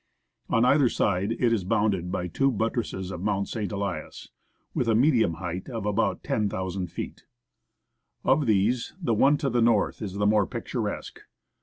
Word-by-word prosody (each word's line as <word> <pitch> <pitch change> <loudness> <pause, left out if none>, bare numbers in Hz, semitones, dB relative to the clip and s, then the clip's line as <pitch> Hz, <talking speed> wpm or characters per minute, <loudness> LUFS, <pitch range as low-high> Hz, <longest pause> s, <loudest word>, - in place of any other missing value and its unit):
On 115 +2 +3
either 135 -1 +4
side 100 +1 0
it 120 0 +1
is 105 -5 0
bounded 95 -2 0
by 90 - -2
two 135 +10 +1
buttresses 110 -5 -2
of 90 -2 -6
Mount 100 0 0
St. 110 -3 -3
Elias, 100 -6 -4 0.5
witli 125 - 0
a 115 - +3
medium 120 - +3
height 90 - -5
of 115 -5 -4
about 105 +2 0
10,000 95 -3 -2
feet. - - -7 1.0
Of 140 0 +3
these 110 +4 +1
the 130 -11 0
one 135 +7 +4
to 140 -4 -1
tlie 120 -1 +2
north 115 -3 +2
is 100 -4 -4
the 105 0 0
more 105 -1 +3
picturesque. - - -4
105 Hz, 165 wpm, -26 LUFS, 95-120 Hz, 1.0 s, either